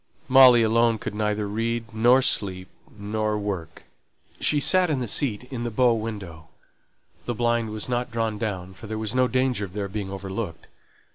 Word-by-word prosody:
Molly 130 -3 +7
alone 115 +1 +3
could - - -6
neither 105 0 -1
read, 115 +2 -3
nor 120 +4 +4
sleep, 95 -5 0 0.3
nor 105 +1 -2
work. 100 -6 -5 0.6
She 150 - +2
sate 185 +4 +3
in 145 -4 0
the 125 - -3
seat 110 0 0
in 120 -2 -4
the 120 - -2
bow 120 +2 +3
window; 100 -8 -6 0.8
the 120 - -3
blind 120 -1 0
was 110 0 -3
not 125 0 -2
drawn 115 -3 -2
down, 95 -4 -4
for 95 +4 -11
there 110 +1 -4
was 110 -1 -4
no 130 0 +3
danger 130 -4 0
of 95 -3 -7
their 100 -1 -3
being 100 0 -5
overlooked. 95 -2 -6
110 Hz, 180 wpm, -24 LUFS, 100-120 Hz, 0.8 s, Molly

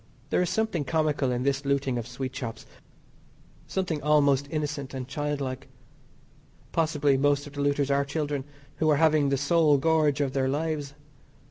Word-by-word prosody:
There - - +3
is 180 - 0
something 220 -8 0
comical 150 -2 0
in 125 0 -1
this 140 +1 0
looting 140 -3 0
of 115 - -6
sweet 130 +1 -5
shops 115 -5 -6 1.0
something 180 -6 -2
almost 140 -2 +3
innocent 145 -3 -3
and 130 -1 -5
child 145 +1 -3
like. 130 0 -5 1.0
Possibly 150 -4 +2
most 145 +1 +2
of 145 - -11
the 145 - -4
looters 140 0 +1
are 140 0 +3
children 145 -1 -2 0.3
who 155 - +2
are 150 - +4
having 155 -2 +3
the 140 - +1
sole 150 +1 +3
gorge 155 0 +2
of 140 -2 0
their 135 -1 +1
lives. 145 -1 -2
145 Hz, 165 wpm, -27 LUFS, 135-150 Hz, 1.0 s, are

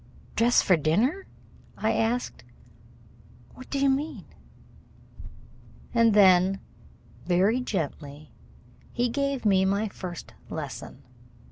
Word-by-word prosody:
"Dress 240 +1 +4
for 185 - +4
dinner?" 225 - 0 0.5
I - - 0
asked. 235 +2 -1 1.1
"What 255 - -13
do 280 - -2
you 275 0 +2
mean?" 280 +4 -1 1.7
And 230 -3 +4
then 190 -1 +5 0.7
very 190 +7 +2
gently 155 - -5 0.6
he 245 0 0
gave 275 0 -2
me 190 -2 +4
my 200 +3 0
first 180 -3 -8 0.2
lesson. - - -7
215 Hz, 100 wpm, -26 LUFS, 185-250 Hz, 1.7 s, then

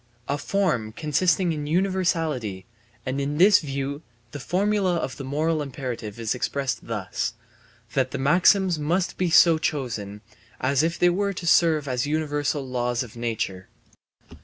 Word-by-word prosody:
A 145 +1 -1
form, 150 - 0
consisting 165 - +1
in 150 -1 -4
universality; 165 - 0 0.4
and 130 +2 -2
in 145 +2 -2
this 195 +4 +7
view 140 0 -4 0.3
the 145 - -6
formula 190 +4 +1
of 135 -6 -3
the 140 - -6
moral 155 +4 0
imperative 125 -6 -5
is 110 -2 -1
expressed 135 +1 -2
thus, 115 +1 -3 0.6
that 130 -1 +1
the 140 - -4
maxims 175 +5 +3
must 170 +5 0
be 180 -1 +1
so 165 -1 +6
chosen 115 -10 -3 0.4
as 135 +1 +2
if 165 +1 0
they 175 0 +4
were 200 +2 0
to 180 - -7
serve 160 -3 +4
as 125 +1 -1
universal 145 -2 -1
laws 125 -1 -1
of 115 -2 -12
nature. 110 -5 -3
145 Hz, 150 wpm, -24 LUFS, 125-170 Hz, 0.6 s, this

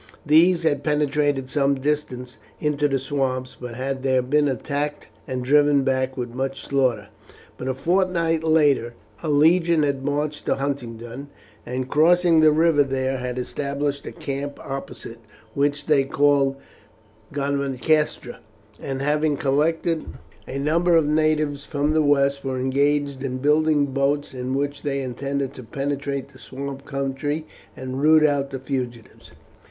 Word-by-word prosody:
These 165 +3 +5
had 145 -3 +1
penetrated 145 -2 +1
some 140 0 +1
distance 130 -3 -3 0.2
into 150 -1 +1
the 135 -1 0
swamps, 130 -1 -2
but 120 -2 -6
had 130 +1 -3
there 130 -1 +2
been 145 +3 +2
attacked 145 +2 -3 0.2
and 130 -2 -3
driven 145 0 +4
back 130 0 0
with 120 -2 -4
much 135 +1 -4
slaughter. 125 -7 0 0.5
But 130 - -6
a 130 - -1
fortnight 170 +1 +1
later 145 -7 +2 0.3
a 160 - -3
legion 165 +2 +4
had 140 -2 -1
marched 145 +1 -2
to - - +2
Huntingdon, 130 -2 -5 0.4
and 125 +1 -3
crossing 165 +3 +4
the 155 -1 +6
river 155 -1 +4
there 135 -1 -2
had 125 0 -4
established 140 +2 -3
a - - -5
camp 145 -3 -5
opposite, 125 -4 -7 0.3
which 145 +1 0
they 145 -3 +3
called 140 0 +2 0.8
Godmancastra, 140 -1 0 0.4
and, 135 0 -4
having 150 0 +1
collected 160 +4 0 0.4
a 135 - -5
number 165 +5 +2
of 160 -3 +4
natives 155 -2 +1
from 145 0 0
the 155 - +3
west, 140 -1 +2
were 130 -1 -2
engaged 140 +1 0
in 130 -2 -2
building 150 +1 +3
boats 140 +1 -1
in 130 0 -3
which 145 +1 -2
they 140 -1 -2
intended 135 +2 -3
to 130 - -10
penetrate 140 +2 -3
the 130 -2 -17
swamp 140 +1 -7
country 140 +3 -3 0.3
and 130 +1 -5
root 155 +1 +6
out 140 -2 +1
the 135 - -5
fugitives. 125 -3 -6
140 Hz, 145 wpm, -23 LUFS, 135-150 Hz, 0.8 s, the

